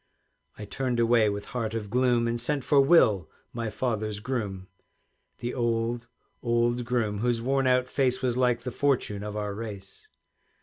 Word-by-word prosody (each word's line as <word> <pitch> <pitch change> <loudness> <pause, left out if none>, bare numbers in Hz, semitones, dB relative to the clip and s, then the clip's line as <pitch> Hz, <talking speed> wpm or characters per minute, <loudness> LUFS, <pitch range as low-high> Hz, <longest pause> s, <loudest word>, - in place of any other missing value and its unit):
I 105 - -7
turned 125 +3 -2
away 115 -2 +4
with 100 0 -4
heart 115 -3 -2
of 105 -3 -4
gloom, 125 -1 +2
And 115 0 -1
sent 140 +2 -1
for 140 0 +4
Will, 115 - +4 0.2
my 115 -2 -3
father's 110 -2 -2
groom, 105 -6 -4 0.7
The 120 0 -4
old, 115 -1 -1 0.3
old 120 0 +1
groom, 115 -4 -1
whose 120 +1 +1
worn 135 +2 +1
out 125 0 +3
face 130 -1 +1
Was 125 -2 0
like 125 -2 +2
the 125 - -4
fortune 125 -7 0
of 105 0 -5
our 105 -1 -3
race. 100 -2 -8
120 Hz, 165 wpm, -27 LUFS, 105-125 Hz, 0.7 s, away